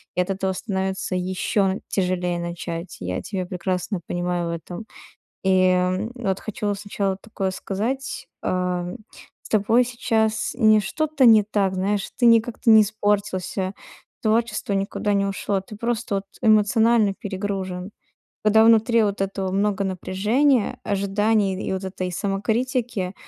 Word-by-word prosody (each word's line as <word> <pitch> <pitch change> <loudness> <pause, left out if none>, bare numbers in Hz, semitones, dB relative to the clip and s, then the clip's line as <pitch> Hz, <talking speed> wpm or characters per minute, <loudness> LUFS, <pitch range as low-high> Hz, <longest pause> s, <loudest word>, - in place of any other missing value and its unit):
и 180 - +2
от 180 - -3
этого 190 0 -1
становится 190 -2 -2
ещё 190 +2 0
тяжелее 180 -2 -1
начать. 170 0 -5
Я 90 0 -3
тебя 190 -3 -4
прекрасно 180 +1 -2
понимаю 175 -1 -1
в - - -2
этом. 175 +6 -8 0.6
И, 185 -1 +4
м, 185 +4 +1
вот 195 -7 -2
хочу 205 -1 -3
сначала 200 -1 -2
такое 195 -3 -3
сказать: 260 +8 -3 0.2
а, 180 -1 0
м, 180 +7 -5 0.5
с - - -13
тобой 225 +4 +3
сейчас 225 -3 0
не 215 -3 +6
что-то 310 +5 0
не 220 -2 +8
так. 200 -2 0
Знаешь, 195 +2 -1
ты 245 - 0
не 230 -1 +7
как-то 230 +1 -1
не 220 - +9
испортился. 200 -2 -1 0.5
Творчество 220 -1 0
никуда 200 +1 -1
не 200 0 +2
ушло. 195 0 -1
Ты 205 +2 -11
просто 235 -2 -2
вот 195 - -3 0.2
эмоционально 220 -1 +4
перегружен. 190 -1 -4 0.5
Когда 220 +1 +5
внутри 230 +1 +5
вот 205 -1 -1
этого 195 -1 -2
много 200 +1 +1
напряжения, 210 +7 +1
ожиданий 200 +1 +1
и 190 - -5
д - - 0
вот 190 - -3
этой 185 -1 -4
самокритики, 210 +1 -1
200 Hz, 145 wpm, -23 LUFS, 185-220 Hz, 0.6 s, не